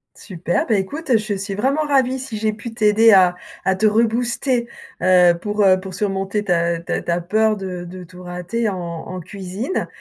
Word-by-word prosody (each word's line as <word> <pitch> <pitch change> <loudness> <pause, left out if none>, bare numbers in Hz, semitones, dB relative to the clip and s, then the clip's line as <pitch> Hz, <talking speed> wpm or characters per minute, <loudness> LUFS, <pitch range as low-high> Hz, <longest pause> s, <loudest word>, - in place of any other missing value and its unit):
Super, 175 -3 -2
bah 225 - +2
écoute, 255 +7 0
je 215 -1 -3
suis 195 0 -4
vraiment 270 +8 +1
ravie 265 -2 +2
si 255 -4 -6
j'ai 215 0 0
pu 225 +2 -8
t'aider 220 0 +4
à 180 -2 +5 0.3
à 190 - +3
te 215 +3 +2
rebooster, 235 +3 +1 0.3
heu, 180 -1 +5
pour, 210 +1 0
heu, 185 -1 +5
pour 185 -1 -8
surmonter 195 0 -1
ta 170 -3 +1
ta 170 - -3
ta 170 0 -1
peur 215 +5 +1
de 185 -2 -5
de 180 +1 -9
tout 180 +1 -13
rater 180 +6 -3
en 195 - -3
en 170 +1 -6
cuisine, 195 - -4
200 Hz, 185 wpm, -20 LUFS, 180-225 Hz, 0.3 s, à